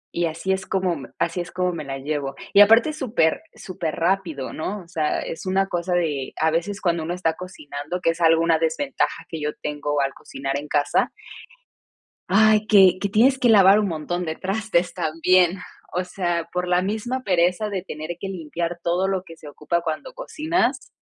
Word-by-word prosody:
y 170 - +1
así 165 +4 -3
es 190 0 -4
como 185 -3 0
me 140 - -9
así 170 +1 -1
es 175 - -8
como 180 -1 -1
me 165 - -5
la 135 -1 -5
llevo. 140 -1 -3 0.2
Y 205 - +8
aparte 225 +7 +6
es 310 - -10
súper 215 - +1
superrapido, 170 -4 -2
¿no? 190 +4 -4
o - - -20
sea, 160 -3 -1
es 165 - -6
una 195 +1 +1
cosa 175 0 -2
de, 150 -6 -1
a 160 0 +3
veces 195 +5 -2
cuando 170 -3 0
uno 170 +2 -3
está 165 -3 0
cocinando, 155 -2 -7
que 165 - +2
es 170 +1 -8
algo 165 0 +5
una 165 -1 +3
desventaja 165 - -1
que 160 -2 -6
yo 150 - -1
tengo 145 0 -2
al 135 0 -1
cocinar 135 +1 -5
en 145 - -6
casa 145 -1 +1 1.2
ay, 215 +2 +4
que 190 -4 +6
que 200 - -1
tienes 255 +6 +4
que 245 -2 +2
lavar 200 -1 +7
un 210 - +1
montón 175 +2 -3
de 160 0 -3
trastes 195 -2 -1
también. 175 +3 +2 0.3
O 180 - 0
sea, 175 -2 -2
por 180 0 -1
la 180 0 +3
misma 220 +6 -2
pereza 180 +2 +1
de 190 -3 -3
tener 155 0 -6
que 195 - -5
limpiar 170 -1 -4
todo 180 +3 0
lo 190 -1 -1
que 165 -3 -12
se 150 - -13
ocupa 155 +4 -2
cuando 160 - -4
cocinas, 315 - -1
175 Hz, 195 wpm, -23 LUFS, 160-195 Hz, 1.2 s, Y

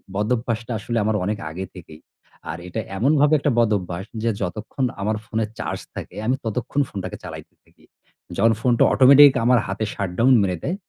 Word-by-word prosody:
বদঅভ্যাসটা 115 +2 -1
আসলে 115 +3 -3
আমার 110 +1 0
অনেক 105 +2 -1
আগে 90 +4 -5
থেকেই। 80 -4 -12 0.5
আর - - -6
এটা 90 - -4 0.2
এমনভাবে 145 +6 +3
একটা 145 - +1
বদঅভ্যাস 95 -5 0 0.2
যে, 115 - +2
যতক্ষণ 110 +7 -3 0.2
আমার 110 +2 0
ফোনের 110 -1 -2
চার্জ - - -3 0.2
থাকে, - - -8
আমি 130 - +2
ততক্ষণ 125 +6 -1
ফোনটাকে 95 -3 -6
চালাইতে - - -9
থাকি। - - -28 0.5
যখন 115 +2 +4
ফোনটা 120 -1 +3
অটোমেটিক 140 +1 +8
আমার 125 0 +5
হাতে 100 +3 -2
shutdown 100 +7 +1
মেরে 90 -3 0
দেয়, 175 - -1
110 Hz, 165 wpm, -22 LUFS, 95-125 Hz, 0.5 s, অটোমেটিক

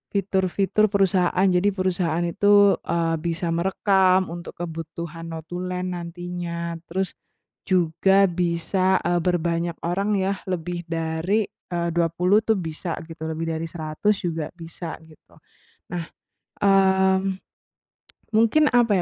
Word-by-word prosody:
fitur-fitur 195 +2 +1
perusahaan, 190 -2 +2
jadi 190 +1 +3
perusahaan 175 -3 0
itu, 205 +3 +4
eee, 165 -1 +1
bisa 170 +1 -2
merekam 185 +1 +2
untuk 170 0 -8
kebutuhan 165 0 -6
notulen 180 +3 -4
nantinya. 170 -1 -5
Terus 190 +2 -2 0.6
juga 185 +2 +3
bisa, 180 +2 +1
eee, 175 0 +1
berbanyak 170 -1 0
orang 195 +5 0
ya, 195 0 0
lebih 175 -1 -3
dari, 165 +5 0 0.3
eee, 170 -1 0
20 175 +4 +2
tuh 220 0 +1
bisa 165 -1 -4
gitu, 160 -1 -7
lebih 165 +1 -3
dari 165 - -3
100 160 +5 -1
juga 165 -3 -2
bisa, 165 -1 -7
gitu. 160 -1 -20 0.6
Nah, 170 - -2 0.6
eee, 190 -1 +4 1.2
mungkin 230 +7 +4
apa 240 -4 +4
175 Hz, 115 wpm, -24 LUFS, 165-190 Hz, 1.2 s, itu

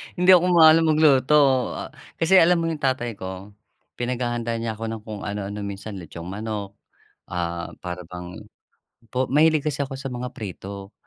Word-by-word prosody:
Hindi 180 +1 +1
ako 180 -1 +7
maalam 165 -1 +7
magluto. 140 -3 +4 0.5
Kasi 180 +4 +5
alam 170 0 +5
mo 165 - -1
'yong 160 -2 -4
tatay 120 -5 -1
ko, 95 +2 -7 0.5
pinaghahanda 120 -1 -2
niya 115 -1 -3
ako 115 - -5
ng 110 -1 -5
kung 105 -2 -7
anu-ano. 100 0 -4
Minsan 100 +1 -6
litsong 85 -1 -9
manok, 105 0 -5 0.5
ah, 85 -1 -3
para 90 0 -5
bang 90 0 -8 0.7
po 130 +2 0
mahilig 155 +1 +3
kasi 145 -2 -1
ako 135 -1 -4
sa 135 0 -5
mga 125 +1 -4
prito. 100 0 -8
120 Hz, 155 wpm, -23 LUFS, 100-145 Hz, 0.7 s, ako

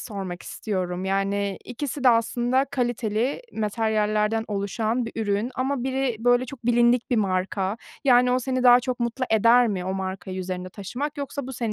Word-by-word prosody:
sormak 190 -6 -6
istiyorum, 185 -3 -3
yani 195 +1 -1
ikisi 270 +2 -5
de - - +8
aslında 240 +3 +2
kaliteli 240 - -1
materyallerden 215 0 0
oluşan 215 +4 -1
bir 230 - -7
ürün 205 +4 0
ama 260 0 -1
biri, 265 -3 -1
böyle, 245 +2 +3
çok 245 -3 -9
bilindik 240 0 +3
bir 245 - +2
marka, 190 0 0 0.3
yani 250 -2 +5
o 255 - +3
seni 255 0 -1
daha 245 0 +7
çok 250 0 -3
mutlu 235 +2 -1
eder 230 +2 +5
mi 190 -4 -2
o 190 +1 -2
markayı 190 0 -4
üzerinde 185 0 -4
taşımak? 250 +11 -5
Yoksa 280 -1 -4
bu 265 - -6
senin 230 -3 -2
230 Hz, 170 wpm, -24 LUFS, 200-250 Hz, 0.3 s, de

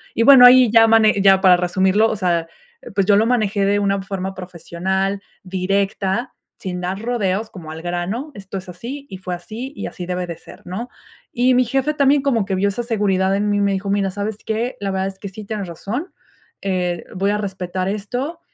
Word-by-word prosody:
y 230 - +2
bueno, 260 -1 +9
ahí 250 -3 +6
ya 225 -1 +6
mane 220 -3 +4
ya 195 -1 +5
para 185 -2 +6
resumirlo, 190 +5 +2
o - - -2
sea, 170 -3 0 0.5
pues, 195 - +2
yo 205 - +5
lo 215 - +3
manejé 215 -4 +1
de 200 +1 +2
una 200 -1 0
forma 190 0 -4
profesional, 190 +2 -3 0.2
directa, 195 +4 -1 0.2
sin 180 -1 -5
dar 185 +2 -3
rodeos, 220 -2 -1
como 160 -5 -10
al 160 +1 -8
grano, 175 - -3
esto 195 0 -7
es 185 - -12
así, 265 +10 -8
y 190 - -7
fue 185 -1 -5
así, 230 +10 -8
y - - -5
así 180 - -7
debe 180 0 -3
de 170 -2 -6
ser, - - -14
¿no?, 215 +8 -5 0.4
y 250 +1 +3
mi 255 0 +4
jefe 270 +5 0
también 280 0 +3
como 235 -8 +1
que 195 - -3
vio 195 +2 +1
esa 235 +5 -3
seguridad 195 -4 +1
en 205 +1 0
mí 205 - +1
y - - +1
me 200 0 +2
dijo: 195 +1 -3
"Mira, 195 -1 +1
¿sabes 205 +2 -4
qué?, 225 +3 -2
la 195 - -2
verdad 190 0 -1
es 195 - -7
que 200 - -6
sí 210 +3 -9
tienes 205 -3 -4
razón, 225 - -5 0.5
eh, 180 -3 -2
voy 195 +2 +1
a 210 - 0
respetar 185 -2 -3
esto, 245 - -4
200 Hz, 215 wpm, -20 LUFS, 185-225 Hz, 0.5 s, bueno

